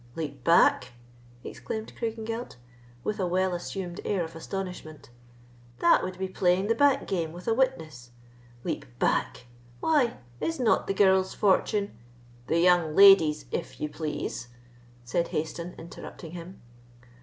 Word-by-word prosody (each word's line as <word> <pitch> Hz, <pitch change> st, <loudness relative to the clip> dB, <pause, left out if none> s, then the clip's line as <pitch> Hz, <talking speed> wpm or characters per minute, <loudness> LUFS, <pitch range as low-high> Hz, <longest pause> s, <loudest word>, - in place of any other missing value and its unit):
"Leap 145 Hz, -5 st, -5 dB
back!" 135 Hz, -5 st, +4 dB, 0.5 s
exclaimed 220 Hz, 0 st, -6 dB
Craigengelt, 225 Hz, +1 st, -4 dB, 0.5 s
with 215 Hz, 0 st, -2 dB
a 185 Hz, -, 0 dB
well 185 Hz, +1 st, +1 dB
assumed 175 Hz, +1 st, -5 dB
air 190 Hz, -4 st, 0 dB
of 160 Hz, 0 st, -8 dB
astonishment, 165 Hz, -5 st, -7 dB, 0.7 s
"that 170 Hz, -, +4 dB
would 185 Hz, -1 st, -5 dB
be 190 Hz, 0 st, -2 dB
playing 185 Hz, 0 st, +1 dB
the 225 Hz, -, +2 dB
back 285 Hz, +3 st, +3 dB
game 165 Hz, -4 st, -2 dB
with 175 Hz, +5 st, -11 dB
a 225 Hz, -, +3 dB
witness! 160 Hz, -, -1 dB, 0.5 s
Leap -, -, -4 dB
back! 120 Hz, -, 0 dB, 0.3 s
Why, 285 Hz, -7 st, +2 dB, 0.2 s
is 325 Hz, -2 st, -2 dB
not 235 Hz, -3 st, +2 dB
the 195 Hz, -, -1 dB
girl's 190 Hz, -1 st, +3 dB
fortune——" 205 Hz, +1 st, +1 dB, 0.5 s
"The 165 Hz, -, +1 dB
young 175 Hz, -3 st, +3 dB
lady's, 180 Hz, -7 st, +7 dB
if -, -, -4 dB
you 150 Hz, -, -2 dB
please," 150 Hz, -5 st, -4 dB, 0.6 s
said 170 Hz, +8 st, -1 dB
Hayston, 165 Hz, +3 st, -4 dB
interrupting 165 Hz, -1 st, -10 dB
him. 175 Hz, -1 st, -10 dB
180 Hz, 135 wpm, -27 LUFS, 160-205 Hz, 0.7 s, lady's